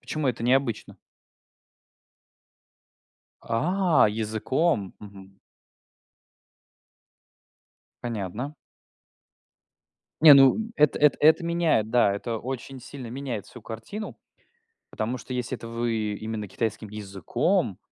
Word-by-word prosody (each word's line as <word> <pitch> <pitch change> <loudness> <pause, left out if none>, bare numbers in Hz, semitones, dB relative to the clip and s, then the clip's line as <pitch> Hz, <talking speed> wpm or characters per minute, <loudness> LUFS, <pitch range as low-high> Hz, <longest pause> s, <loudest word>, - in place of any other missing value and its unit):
почему 155 -2 -3
это 120 -2 -2
необычно? 125 -1 0 2.5
А, 170 - +2
языком? 110 - -1
Мгм. 95 -1 -13 2.7
Понятно. 115 +5 -4 1.7
Не, 155 -2 +10
ну 135 +5 +7 0.2
эт 150 -8 +3
эт 150 -2 +4
это 160 +3 +5
меняет, 165 -10 +1
да. 110 -4 +3
Это 115 +3 -4
очень 130 +2 -6
сильно 130 0 -9
меняет 125 -4 -5
всю 120 - -13
картину, 115 - -7 0.7
потому 110 +4 -3
что 130 - -9
если 125 0 -3
это 115 - -9
вы 115 -2 -2
именно 110 -1 -5
китайским 110 +1 -3
языком, 100 -3 -1
120 Hz, 95 wpm, -26 LUFS, 110-140 Hz, 2.7 s, Не